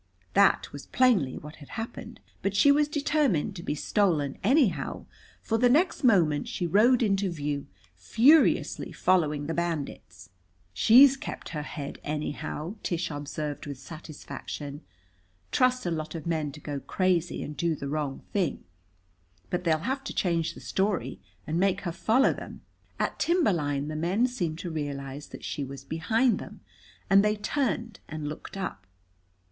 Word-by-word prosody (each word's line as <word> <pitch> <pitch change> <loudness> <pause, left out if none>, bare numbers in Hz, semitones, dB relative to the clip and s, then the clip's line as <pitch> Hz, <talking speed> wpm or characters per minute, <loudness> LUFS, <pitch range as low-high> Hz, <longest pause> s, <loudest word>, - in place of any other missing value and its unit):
That - - +4
was 145 - -9
plainly 220 - +3
what 150 +1 -10
had 145 - -13
happened, 225 0 -7 0.2
but 200 0 -1
she 280 +8 +6
was 295 +1 +3
determined 285 - +1
to 175 - -6
be 150 - -2
stolen 155 -5 +1
anyhow, 250 - +2 0.4
for 225 0 0
the 245 +1 +5
next 320 +7 +2
moment 170 - +3
she 175 - -3
rode 230 +8 +4
into 195 -2 +1
view, 145 -4 -3 0.3
furiously 250 - +4
following 150 -6 +1
the 165 - -2
bandits. 145 - -4 0.4
"She's 255 - +7
kept 270 - -7
her 150 -3 -4
head 145 -1 -6
anyhow," 150 +4 -4
Tish 170 -1 -2
observed 145 0 -5
with 140 -2 -5
satisfaction. 150 -1 -8 0.7
"Trust 255 -2 +2
a 175 - 0
lot 155 0 -4
of 160 - -6
men 160 -3 -1
to 150 - -10
go 145 -1 -4
crazy 180 +1 0
and 150 - -6
do 165 +3 0
the 140 - -6
wrong 145 -2 -3
thing. 185 -7 0 0.9
But 180 0 -2
they'll 160 +1 +1
have 270 +2 -1
to - - -5
change 170 -3 0
the - - -11
story 195 -1 -1 0.3
and 160 +3 -1
make 190 0 +2
her 175 - -3
follow 225 +9 +3
them." - - -9 0.4
At - - -1
timber 340 - +3
line 145 -3 -1
the 155 - -4
men 180 +9 +1
seemed 180 -11 -2
to 175 - -5
realize 145 -2 -5
that - - -11
she 145 - -3
was 135 0 -8
behind 220 - +1
them, - - -10 0.5
and 195 +1 +6
they 210 0 +2
turned 230 -1 -2
and 155 -1 -5
looked 150 +5 -7
up. 95 - -5
170 Hz, 160 wpm, -28 LUFS, 150-220 Hz, 0.9 s, She's